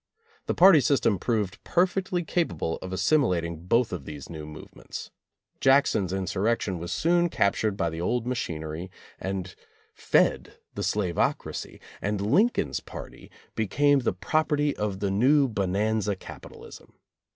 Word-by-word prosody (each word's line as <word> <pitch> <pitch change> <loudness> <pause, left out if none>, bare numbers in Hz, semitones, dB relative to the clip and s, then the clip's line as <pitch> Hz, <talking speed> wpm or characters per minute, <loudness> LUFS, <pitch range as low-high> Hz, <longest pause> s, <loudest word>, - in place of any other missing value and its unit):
The - - 0
party 180 -3 +8
system 125 -8 +2
proved 105 -4 -2
perfectly 180 0 +1
capable 160 - -1
of 95 - -6
assimilat 95 - +2
ing 85 +1 -7
both 115 +1 +2
of 80 -7 -5
these 75 -1 -8
new 80 -2 -7
movements. 75 0 -9 0.5
Jackson's 135 -9 +3
in 95 0 -2
surrection 100 0 -1
was 85 +1 -6
soon 175 +1 +2
captured 100 -4 +1
by 85 - 0
the 80 +1 -5
old 120 +6 0
machinery 85 -8 -4 0.3
and 95 -1 -4 0.4
fed - - +1 0.2
the - - -5
slavocracy, 95 -5 -1 0.2
and 105 0 -1
Lincoln's 165 - +2
party - - -10 0.2
be 110 - -1
came 145 +6 +3
the 120 - 0
property 145 - 0
of 100 -2 -3
the 100 -1 0
new 135 +8 +4
bonanza 105 0 0
capitalism. - - -12
105 Hz, 140 wpm, -26 LUFS, 90-140 Hz, 0.5 s, party